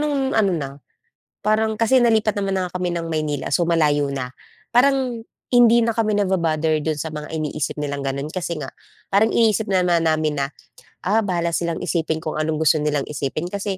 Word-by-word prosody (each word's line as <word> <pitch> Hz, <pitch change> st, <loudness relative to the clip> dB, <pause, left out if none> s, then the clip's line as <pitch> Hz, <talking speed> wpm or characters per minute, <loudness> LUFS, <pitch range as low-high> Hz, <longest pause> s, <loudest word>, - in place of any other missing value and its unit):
no'ng 285 Hz, -3 st, 0 dB
ano 200 Hz, -4 st, +2 dB
na 140 Hz, -3 st, -4 dB, 0.7 s
parang 215 Hz, +1 st, 0 dB
kasi 245 Hz, +3 st, +4 dB
nalipat 220 Hz, -3 st, +3 dB
naman 195 Hz, -1 st, -1 dB
na -, -, 0 dB
nga 180 Hz, -, -6 dB
kami 180 Hz, -, 0 dB
ng 170 Hz, -1 st, -3 dB
Maynila, 155 Hz, -3 st, -2 dB
so 175 Hz, -, +2 dB
malayo 150 Hz, -4 st, +2 dB
na 130 Hz, -2 st, -5 dB, 0.4 s
parang 255 Hz, -2 st, +2 dB, 0.3 s
hindi 235 Hz, -1 st, +6 dB
na 230 Hz, -, 0 dB
kami 215 Hz, -2 st, +1 dB
naba-bother 160 Hz, -5 st, +1 dB
do'n 155 Hz, -1 st, -2 dB
sa 160 Hz, +1 st, -5 dB
mga 150 Hz, 0 st, -6 dB
iniisip 155 Hz, -2 st, -3 dB
nilang 140 Hz, -1 st, -3 dB
gano'n. 140 Hz, +1 st, -3 dB
Kasi 170 Hz, 0 st, -4 dB
nga 135 Hz, -3 st, -7 dB, 0.3 s
parang 205 Hz, +3 st, +3 dB
iniisip 220 Hz, -2 st, +2 dB
na 185 Hz, -1 st, +2 dB
namin 160 Hz, -3 st, +2 dB
na, 140 Hz, -1 st, -2 dB, 0.6 s
ah, 215 Hz, +4 st, +3 dB
bahala 170 Hz, -4 st, -1 dB
silang 170 Hz, 0 st, -1 dB
isipin 160 Hz, -2 st, -1 dB
kung 160 Hz, -1 st, -4 dB
anong 155 Hz, 0 st, -1 dB
gusto 155 Hz, -1 st, +3 dB
nilang 150 Hz, -2 st, 0 dB
isipin 150 Hz, +2 st, -3 dB
kasi 200 Hz, +1 st, -3 dB
170 Hz, 185 wpm, -21 LUFS, 155-215 Hz, 0.7 s, hindi